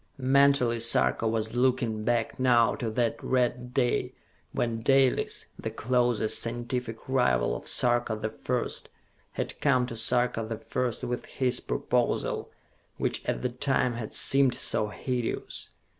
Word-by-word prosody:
Mentally 135 -3 +3
Sarka 115 0 +3
was 110 0 -1
looking 120 -4 +1
back 120 +1 -1
now 125 -2 +4
to 115 - -3
that 115 +1 -1
red 125 -1 0
day 125 -1 0 0.4
when 115 -1 -2
Dalis, 135 +1 +2
the - - -3
closest 120 -2 +1
scientific 120 -1 -4
rival 60 - +2
of - - -8
Sarka 120 -2 +1
the 110 0 -4
First, 125 -1 -3 0.4
had - - -4
come 130 -3 +3
to 120 - -6
Sarka 120 0 +1
the 110 0 -4
First 120 +1 -3
with 120 0 -3
his 125 -2 0
proposal 125 -1 -1 0.5
which - - -1
at - - -2
the 125 - +1
time 125 -1 0
had 115 -2 -6
seemed 135 -2 +3
so 105 - +1
hideous. 125 +2 -4
120 Hz, 140 wpm, -28 LUFS, 115-125 Hz, 0.5 s, now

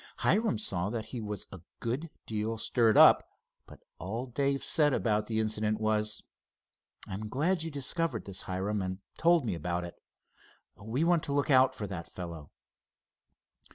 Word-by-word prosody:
Hiram 210 - +2
saw 95 -3 0
that 110 -1 -3
he 120 - -3
was 105 -2 -5
a 95 - -9 0.2
good 130 +8 -3 0.2
deal 110 +1 -2
stirred 115 -1 +3
up, - - +8 0.4
but - - -15 0.2
all 110 +8 -4
Dave 140 +2 -1
said 150 -4 +3
about 105 -2 0
the 110 -1 -1
incident 110 0 0
was: 110 0 0 0.8
"I'm 105 +3 -6
glad 160 - +1
you 165 - -3
discovered 145 -2 -2
this, 100 -1 -3
Hiram, 95 +2 -2
and 95 0 -3 0.2
told 170 -3 +4
me 105 - -1
about 85 +2 -2
it. 85 - -7 0.8
We 110 +9 -2
want 170 -1 +3
to 140 - -2
look 145 +1 +1
out 130 0 +5
for 105 - -4
that 90 -4 -6
fellow." 85 -5 -8
110 Hz, 160 wpm, -30 LUFS, 100-140 Hz, 0.8 s, up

